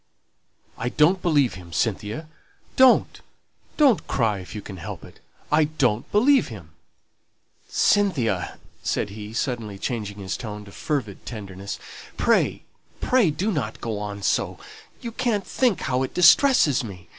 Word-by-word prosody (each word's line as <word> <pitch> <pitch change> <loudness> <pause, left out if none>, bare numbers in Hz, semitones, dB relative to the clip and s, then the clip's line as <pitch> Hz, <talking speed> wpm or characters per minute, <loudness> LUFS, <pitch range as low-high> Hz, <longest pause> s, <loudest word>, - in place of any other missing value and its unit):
"I 125 - -1
don't 170 +8 +3
believe 145 -7 +2
him, 90 -2 -11
Cynthia. 105 - -2 0.5
Don't, 260 -1 +5 0.6
don't 275 -9 +4
cry 110 -6 +1
if 90 +3 -10
you 105 - -5
can 95 - -8
help 85 - -7
it; - - -16 0.3
I 155 +1 +4
don't 130 -7 0
believe 255 +6 +4
him." 95 -9 -10 1.0
"Cynthia," 125 - +1 0.2
said 100 - -1
he, 105 0 -8
suddenly 115 -4 -3
changing 105 -2 -4
his 95 -2 -4
tone 105 -2 -7
to 100 - -13
fervid 120 -6 -3
tenderness, 100 -3 -7 0.4
"pray, - - +2 0.4
pray 250 -8 +3
do 190 +8 -1
not 120 - -3
go 110 -3 -3
on 100 -1 -6
so; - - 0 0.4
you 235 - -5
can't 230 -4 -1
think 245 -7 +1
how 125 0 0
it 130 - -3
distresses 175 - +5
me!" 90 -7 -10
120 Hz, 145 wpm, -24 LUFS, -, 1.0 s, Don't